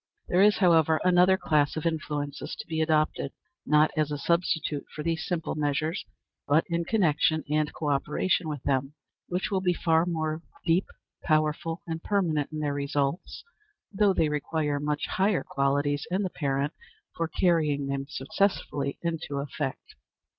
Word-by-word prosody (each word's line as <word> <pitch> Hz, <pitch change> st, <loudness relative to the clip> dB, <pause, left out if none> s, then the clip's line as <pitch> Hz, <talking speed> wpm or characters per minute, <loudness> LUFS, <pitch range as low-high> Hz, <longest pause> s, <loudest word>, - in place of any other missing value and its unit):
There 180 Hz, -, +4 dB
is, 210 Hz, +1 st, +5 dB
however, 165 Hz, -4 st, +4 dB
another 180 Hz, +1 st, +5 dB
class 150 Hz, -3 st, +1 dB
of 155 Hz, -, -3 dB
influences 150 Hz, -3 st, -3 dB
to -, -, -8 dB
be 160 Hz, -1 st, -2 dB
adopted, 155 Hz, -3 st, +1 dB, 0.3 s
not 150 Hz, +1 st, +4 dB
as 155 Hz, -2 st, +1 dB
a 145 Hz, -, -1 dB
substitute 160 Hz, -2 st, 0 dB
for 150 Hz, -, -7 dB
these 165 Hz, 0 st, -1 dB
simple 170 Hz, -3 st, -2 dB
measures, 150 Hz, +2 st, -1 dB, 0.4 s
but 150 Hz, +3 st, +4 dB
in 170 Hz, 0 st, 0 dB
connection 160 Hz, -6 st, +2 dB
and 150 Hz, 0 st, +1 dB
co 150 Hz, -2 st, -2 dB
operation 155 Hz, +4 st, 0 dB
with 145 Hz, -4 st, -5 dB
them, 135 Hz, +1 st, 0 dB, 0.3 s
which 180 Hz, +3 st, -2 dB
will 190 Hz, -1 st, +1 dB
be 180 Hz, -2 st, +1 dB
far 165 Hz, +1 st, +2 dB
more 160 Hz, -2 st, -2 dB, 0.2 s
deep, 175 Hz, +2 st, +2 dB, 0.4 s
powerful, 155 Hz, +2 st, 0 dB
and 165 Hz, -2 st, -4 dB
permanent 165 Hz, -9 st, 0 dB
in 155 Hz, 0 st, -4 dB
their 145 Hz, -1 st, 0 dB
results, 140 Hz, -, -2 dB, 0.5 s
though 200 Hz, 0 st, +4 dB
they 160 Hz, -, +3 dB
require 150 Hz, 0 st, -1 dB
much 150 Hz, 0 st, -1 dB
higher 195 Hz, 0 st, +1 dB
qualities 145 Hz, +1 st, 0 dB
in 190 Hz, +3 st, 0 dB
the 185 Hz, -, -2 dB
parent 140 Hz, 0 st, -1 dB, 0.4 s
for 165 Hz, -, -1 dB
carrying 155 Hz, -5 st, +1 dB
them 140 Hz, 0 st, -3 dB
successfully 140 Hz, -2 st, -1 dB
into 165 Hz, -4 st, -3 dB
effect. 140 Hz, -1 st, -4 dB
155 Hz, 155 wpm, -27 LUFS, 145-170 Hz, 0.5 s, is